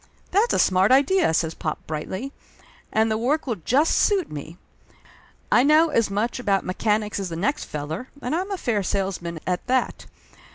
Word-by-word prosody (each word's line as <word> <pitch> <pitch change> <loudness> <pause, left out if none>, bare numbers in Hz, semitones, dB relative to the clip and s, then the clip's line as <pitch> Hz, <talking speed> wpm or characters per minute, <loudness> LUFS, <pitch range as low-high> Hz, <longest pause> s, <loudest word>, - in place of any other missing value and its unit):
"That's 420 +6 +3
a - - +2
smart 190 +3 +3
idea!" 285 - +4
says 160 0 0
pop 155 -1 -5
brightly. 185 - -5 0.6
"And 220 0 +2
the 220 - 0
work 285 +7 0
will 235 -6 -2
just 270 - +2
suit 395 -4 +2
me. 150 +3 -8 0.9
I - - +6
know 305 +4 +5
as 230 -8 +1
much 215 +5 -1
about 200 -5 0
mechanics 210 +2 -1
as 195 -2 -3
the 165 - -5
next 245 - -1
feller, 155 - -5
and 250 +1 -3
I'm 370 +4 -1
a 395 - -2
fair 230 - 0
salesman, 185 -4 -3
at 180 -1 -2
that 255 0 -1
215 Hz, 175 wpm, -23 LUFS, 185-275 Hz, 0.9 s, I